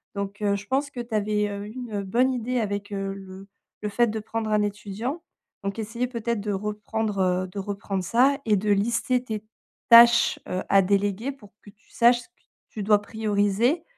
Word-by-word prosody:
donc 200 +1 -5
heu, 200 -1 +2
je 200 +1 -6
pense 280 +2 0
que 245 - -5
tu 235 -1 -9
avais, 210 0 0
heu, 200 0 -5
eu 215 - -9
une 235 -5 -4
bonne 240 +7 +2
idée 250 +1 -1
avec, 205 0 -3
heu, 195 0 -3
le 195 0 -11 0.3
le 210 - -2
fait 240 +4 +2
de 220 0 -3
prendre 220 +1 -4
un 210 0 +3
étudiant. 210 - -4 0.4
Donc 195 +1 -3
essayer 230 +3 -2
peut-être 235 -2 -2
de 210 0 -3
reprendre, 210 +1 -3 0.3
heu - - -8
de 200 - -6
reprendre 195 -1 -3
ça 255 +9 +3
et 215 -2 +3
de 205 +2 0
lister 235 +4 +1
tes 215 -3 -5 0.5
tâches, 235 0 +7
heu, 185 - -2
à 195 - +6
déléguer 200 +5 0
pour 210 -7 -17
que - - -13
tu 215 +1 -31
saches 240 0 +4
ce - - -16
que - - -53 0.4
tu 215 - -6
dois 210 0 +4
prioriser 215 - 0
210 Hz, 200 wpm, -25 LUFS, 200-235 Hz, 0.5 s, tâches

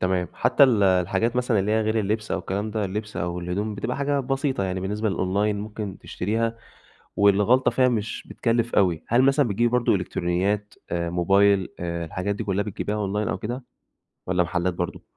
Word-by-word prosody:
تمام، 90 -1 0
حتى - - +4
ال 115 -6 +3
الحاجات 95 +5 +2
مثلًا 125 -3 +1
اللي 100 +2 +1
هي 110 - +3
غير 110 +1 0
اللبس 105 +1 -1
أو - - 0
الكلام 100 +3 -3
ده، 105 -1 -1
اللبس 105 +2 -5
أو 90 -1 -2
الهدوم 100 +5 -3
بتبقى 115 +4 -3
حاجة 140 0 0
بسيطة 135 -4 -1
يعني 95 0 -2
بالنسبة 105 +3 -1
للأونلاين 100 +3 0
ممكن 105 -2 -6
تشتريها 115 +4 -2 0.6
والغلطة 105 +6 +4
فيها 130 -1 +3
مش 110 -3 -3
بتكلف 115 0 0
أوي، 90 -6 +2
هل 120 +3 +4
مثلًا 135 0 +3
بتجيبي 115 +4 +2
برضو 125 -1 +2
إلكترونيات 95 +3 -1 0.2
آآ، 85 0 -1
موبايل 95 +2 +3
آآ، 85 -1 -3
الحاجات 90 +5 -3
دي 110 - -4
كلّها 100 0 0
بتجيبيها 105 0 -3
أونلاين 105 0 -1
أو - - -2
كده، 120 +4 -5 0.6
والّا 90 -1 +2
محلات 90 +1 -1
برضو؟ 90 0 -4
105 Hz, 180 wpm, -24 LUFS, 95-115 Hz, 0.6 s, حتى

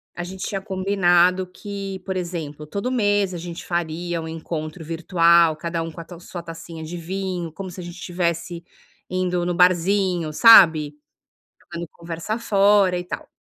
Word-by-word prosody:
a 175 - -4
gente 185 +1 -6
tinha 195 -1 -3
combinado 185 -2 +2
que, 195 +1 -7
por 190 -1 -3
exemplo, 160 -4 -5
todo 200 +10 -3
mês 205 -5 +1
a - - -4
gente 170 0 -7
faria 170 0 -2
um 160 - -6
encontro 160 0 -5
virtual, 170 0 +3
cada 165 +1 -3
um 165 - -6
com 160 - -11
a 165 - -8
tal 175 0 -12
sua 175 0 -7
tacinha 165 -1 -9
de 165 +3 -7
vinho, 180 -1 -4
como 190 +3 -7
se 180 - -8
a - - -8
gente 175 0 -8
estivesse 170 -1 -3 0.5
indo 180 -1 -1
no 175 - 0
barzinho, 180 -1 +2
sabe, 160 -7 +7 0.6
jogando 170 0 -8
conversa 170 +5 -5
fora 200 -4 +3
e - - -5
tal. - - -6
175 Hz, 170 wpm, -22 LUFS, 165-190 Hz, 0.6 s, sabe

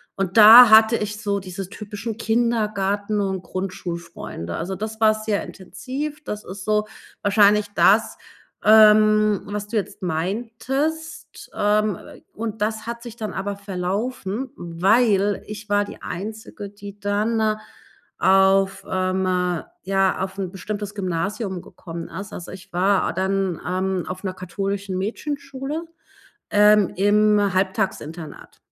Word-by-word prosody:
und 195 +2 -2
da 225 +3 +11
hatte 220 +1 +7
ich 210 0 -4
so 200 -2 -1
diese 190 0 -7
typischen 210 +2 -6
Kindergarten 215 -3 0
und 190 -2 -1
Grundschulfreunde. 170 - -6
Also, 185 +3 -4
das 215 +3 -6
war 215 -1 +6
sehr 215 -1 -2
intensiv. 270 - -6
Das 210 -6 -6
ist 190 +1 -8
so 215 0 +1 0.3
wahrscheinlich 205 0 +4
das, 220 +3 +4 0.5
ähm, 215 -1 +6
was 205 0 -4
du 225 - -6
jetzt 205 -1 -3
meintest, 235 - -3
ähm, 210 -1 +1
w - - -13
w - - -32
und 220 -1 -5
das 220 +1 -2
hat 235 0 -5
sich 235 -2 -9
dann 215 -1 -5
aber 200 +1 -4
verlaufen, 200 +5 -3
weil 200 +4 +2
ich 210 +1 -8
war 205 0 +2
die 205 - -10
Einzige, 205 +1 -7
die 205 0 -11
dann 215 +1 0 0.6
auf, 195 0 +3
ähm, 185 0 0 0.6
ja, 195 0 +1
auf 190 +1 -4
'n 190 -2 -3
bestimmtes 205 +1 -5
Gymnasium 190 +1 -3
gekommen 165 -1 -9
ist. 205 +2 -8
Also, 175 - -8
ich 190 0 -12
war 190 +2 +2
dann, 190 -2 -1
ähm, 185 0 -1
auf 185 +2 -6
'ner 185 - -2
katholischen 195 +1 -4
Mädchenschule, 275 - -4 0.7
ähm, 210 -1 +5
im 205 0 +3
Halbtagsinternat. 185 -5 -3
205 Hz, 130 wpm, -22 LUFS, 190-215 Hz, 0.7 s, da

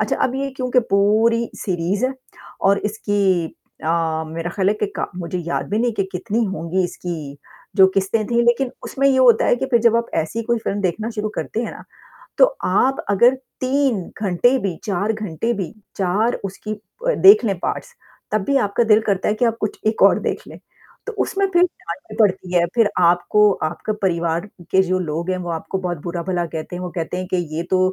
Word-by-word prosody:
अच्छा 215 - 0
अब 255 - -1
ये 275 0 -2
क्योंकि 250 0 +2
पूरी 220 +4 +3
सीरीज़ 185 +4 -1
है 265 - -4 0.5
और 200 +1 +4
इसकी 200 -4 0 0.4
अ, 160 -1 0
मेरा 165 +2 -4
ख़्याल 190 0 0
है 210 - +2
कि 210 - +2
का - - -1
मुझे 180 +1 -4
याद 170 - -2
भी 210 - +1
नहीं 240 0 +1
कि 200 - 0
कितनी 215 +5 -1
होंगी 185 -1 -1
इसकी 175 0 -5 0.6
जो 190 -2 +8
किस्तें 195 +3 +1
थीं 235 +1 +2
लेकिन 240 +2 +2
उसमें 275 +1 0
ये 265 - +3
होता 240 -4 +5
है - - +4
कि 265 - -2
फिर 240 -3 +3
जब 230 -1 +5
आप 235 0 0
ऐसी 165 +9 -1
कोई 235 +1 0
फ़िल्म 205 -2 -3
देखना 205 +5 -1
शुरू 215 -1 -3
करते 225 - -3
हैं 235 - -4
ना, - - -11 0.6
तो - - +8 0.2
आप 260 +9 +2
अगर 240 +6 +5 0.3
3 260 -5 +1 0.2
घंटे 215 +6 +3
भी, 190 -7 -2
4 205 +2 0
घंटे 215 +1 -3
भी, 195 -5 -4 0.3
4 205 +5 +1
उसकी 195 +2 -5 0.3
अ, - - +3
देखलें 315 - +6
पार्ट्स 485 - -4 0.4
तब 215 -2 +1
भी 280 - +2
आपका 215 +4 +1
दिल 215 - +5
करता 195 -2 +1
है 210 - +2
कि 245 - +1
आप 230 -1 0
कुछ 215 - -3
एक 220 - 0
और - - +6
देख - - -2
लें, - - -11 0.5
तो - - -4
उसमें 395 0 0
फिर 350 +1 +5
डाँट 175 - -4
भी - - -7
पड़ती 185 -3 +2
है 170 - +4
फिर 225 -3 +4
आपको 180 +4 +4 0.2
आपके 215 +5 -4
परिवार 170 0 0 0.2
के 190 - +5
जो 185 0 0
लोग 170 0 -3
हैं 185 - -1
वो - - -4
आपको 165 +4 -3
बहुत 180 -3 -3
बुरा-भला 175 0 -2
कहते 160 +1 -6
हैं। 180 - -5
वो 180 - -4
कहते 170 +1 -3
हैं 185 0 -4
कि - - +3 0.2
ये 170 - -1
तो 185 - +3
200 Hz, 210 wpm, -20 LUFS, 180-230 Hz, 0.6 s, जो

